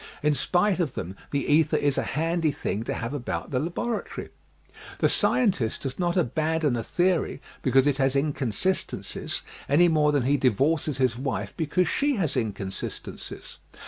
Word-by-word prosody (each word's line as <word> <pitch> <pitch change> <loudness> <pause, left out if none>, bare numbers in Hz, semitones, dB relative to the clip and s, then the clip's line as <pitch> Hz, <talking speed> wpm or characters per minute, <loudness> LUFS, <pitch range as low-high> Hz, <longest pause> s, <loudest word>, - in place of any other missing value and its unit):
In 150 0 +4
spite 180 +7 +1
of 160 -7 -1
them 95 +3 -5
the 140 -1 -1
ether 150 +1 +3
is 145 -1 +1
a - - +1 0.2
handy 165 0 +1
thing 110 -6 -3
to - - -2
have 120 +3 -4
about 135 -4 -4
the 130 - +1
laboratory. 175 - -3 0.7
The - - +3
scientist 185 - +2
does 135 +2 -4
not 175 0 +1
abandon 155 -1 +1
a 115 - -1
theory 175 +5 0 0.2
because 135 0 +4
it 145 -2 +2
has 135 -1 +2
inconsistencies 140 - -1 0.3
any 170 +5 +5
more 150 -2 +3
than 145 -3 +2
he 140 +3 +3
di 130 -1 +4
vorces 150 +5 +1
his 125 -3 +1
wife 135 0 -3
because 170 +3 +1
she 285 - +1
has 170 - 0
inconsistencies. 100 -4 -5
145 Hz, 165 wpm, -26 LUFS, 130-170 Hz, 0.7 s, any